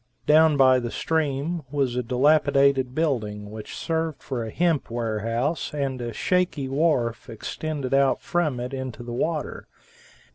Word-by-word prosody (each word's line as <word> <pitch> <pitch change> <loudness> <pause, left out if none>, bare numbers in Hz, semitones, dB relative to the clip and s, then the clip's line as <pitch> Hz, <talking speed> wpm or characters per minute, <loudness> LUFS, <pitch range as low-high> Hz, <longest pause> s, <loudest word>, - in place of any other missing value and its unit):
Down 155 0 +5
by 130 -1 +6
the 120 -1 -4
stream 160 +3 -1
was 135 -4 0
a 125 - +1
dilapidated 135 0 +3
building 105 -10 -1
which 110 -1 -8
served 160 -2 -2
for 125 -4 -3
a 110 - -5
hemp 165 +1 0
warehouse, 115 +7 -2
and 135 -3 -2
a 120 -1 -3
shaky 180 - 0
wharf 135 -5 0
extended 140 +4 -4
out 135 -1 +3
from 155 -8 -1
it, 125 +2 -5
into 130 -3 -5
the 120 0 -6
water. 155 +5 -2
135 Hz, 145 wpm, -25 LUFS, 120-155 Hz, -, by